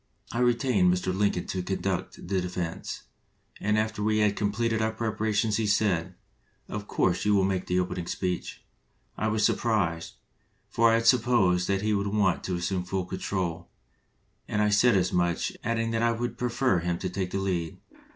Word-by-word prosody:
I 120 - -2
retained 120 -6 +3
Mr. 90 +1 -1
Lin 100 +1 +2
coln 90 - -4
to 95 - -3
conduct 95 -1 -3
the 95 0 0
defense, 90 -2 -4 0.6
and 105 +1 +1
after 110 -1 -1
we 110 +1 +1
had 105 -1 +2
completed 110 +2 0
our 110 0 +1
preparations 110 -1 0
he 110 -2 0
said, 95 -4 +1 0.5
'Of 105 -1 -6
course 90 -1 +1
you 105 0 +3
will 95 - +3
make 95 -1 -1
the 90 0 +1
opening 90 -1 -3
speech.' 90 -2 -3 0.5
I 110 - -1
was 110 -1 +2
sur - - +4
prised, 90 -8 -1 0.5
for 115 0 +4
I 115 - +4
had 115 0 0
supposed 110 -7 +3
that 100 0 0
he 110 0 +1
would 100 0 0
want 100 -3 +1
to 90 - -1
assume 90 +1 -1
full 95 0 -2
control, 90 -2 -3 0.8
and 105 - -1
I 105 0 +3
said 105 +1 +4
as 90 -1 0
much, 85 -1 0
adding 115 0 0
that 115 0 0
I 115 0 +3
would 120 +1 -3
prefer 125 -4 +1
him 85 0 -1
to 95 - -3
take 90 0 -3
the 95 - -3
lead. 90 -4 -2
100 Hz, 190 wpm, -27 LUFS, 90-110 Hz, 0.8 s, sur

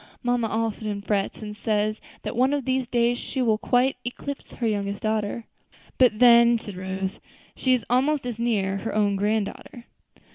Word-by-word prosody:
Mamma 245 -2 +1
often 215 -2 -2
frets, 200 +1 -1
and 210 0 -6
says 215 0 -1 0.2
that - - -4
one 260 +4 +3
of 280 - -3
these 260 -1 0
days 240 0 +1
she 265 - -4
will 225 -4 +2
quite 250 +3 +2
eclipse 275 +3 -6
her 240 - -3
younger 200 -2 0
daughters." 215 +2 -2 0.6
"But 245 -4 +5
then," 235 0 +7
said 210 -3 -9
Rose, 190 +1 -4 0.4
"she 255 -1 +2
is 245 - -4
almost 270 +3 +1
as 240 -2 -4
near; 200 -5 0
her 225 +3 -4
own 205 -2 +2
grand 210 +1 +1
daughter." 240 +4 -10
225 Hz, 175 wpm, -25 LUFS, 205-245 Hz, 0.6 s, then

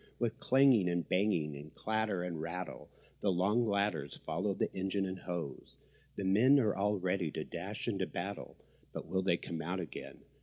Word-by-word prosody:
With 120 +1 -1
clanging 130 -10 +5
and 85 -1 -1
banging 90 -6 +1
and 75 +2 -10
clatter 110 -4 0
and 85 -3 -3
rattle 85 0 -5 0.3
The 100 - +2
long 105 +7 +2
ladders 100 -9 0
follow 95 +5 0
the - - -1
engine 95 +1 0
and 95 0 -4
hose. 85 -6 -5 0.4
The 100 - -3
men 120 +9 +6
are 110 -6 +2
all 105 +1 +2
ready 90 -2 0
to - - -3
dash - - -5
into - - 0
battle; - - -5 0.4
But - - -5
will 95 - 0
they 90 -2 +2
come 80 -2 -5
out 90 +4 -2
again? 85 -5 -7
95 Hz, 180 wpm, -34 LUFS, 85-105 Hz, 0.4 s, men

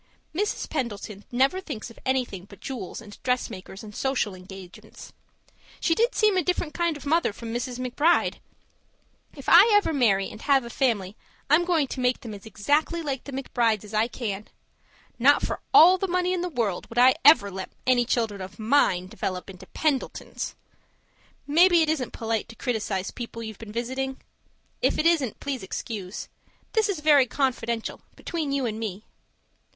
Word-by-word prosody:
Mrs. 410 +6 -1
Pendleton 210 -6 -4
never 270 +9 +2
thinks 250 - -7
of - - -16
anything 250 -8 -1
but 200 -1 -15
jewels 235 -9 -6
and 205 -2 -13
dressmakers 200 -6 -3
and 210 -1 -10
social 265 -7 0
engagements. 185 0 -12 0.7
She 330 - +2
did 465 +8 +1
seem 425 -3 +3
a - - +4
different 340 -2 -1
kind 340 -2 0
of 295 - -12
mother 325 -2 +2
from 225 +2 -7
Mrs. 245 +1 -3
McBride! 270 +7 +1 1.0
If - - -11
I - - +8
ever 410 -5 +3
marry 200 -8 +3
and 215 - -11
have 275 -3 +3
a 235 - -7
family, 215 -8 0 0.4
I'm 315 +3 +6
going 335 -5 +2
to - - -5
make 250 0 +1
them 225 -3 -7
as 205 +2 -10
exactly 290 - 0
like 275 -4 -3
the 280 - -7
McBrides 235 -5 0
as 210 +1 -12
I 215 +2 +2
can. 215 -4 -5 0.7
Not 285 +4 +5
for - - -2
all 370 -2 +8
the 390 - -1
money 365 0 +1
in 360 - -1
the 360 - -2
world 230 - -2
would 230 - -10
I 255 +1 +7
ever 260 -9 +7
let 190 0 -6 0.2
any 250 -1 +4
children 225 -5 -1
of 185 0 -8
mine 215 -6 +2
develop 185 -2 -5
into 185 - -13
Pendletons. 295 -4 -2 0.9
Maybe 335 +3 +5
it 310 - -1
isn't 285 -6 -1
polite 225 -1 -2
to 230 - -11
criticize 215 -6 -2
people 235 -1 -7
you've 220 -2 -8
been 225 -2 -9
visiting? 260 +4 -3 0.6
If - - +2
it 310 - 0
isn't, 315 -9 +2
please 275 -3 -3
excuse. 195 0 -5 0.5
This 440 -2 +2
is 360 -7 -2
very 290 -4 +5
confidential, 235 -4 -2
between 320 -5 -3
you 275 -2 0
and 220 -2 -3
me. 215 -2 -5
250 Hz, 175 wpm, -26 LUFS, 215-300 Hz, 1.0 s, I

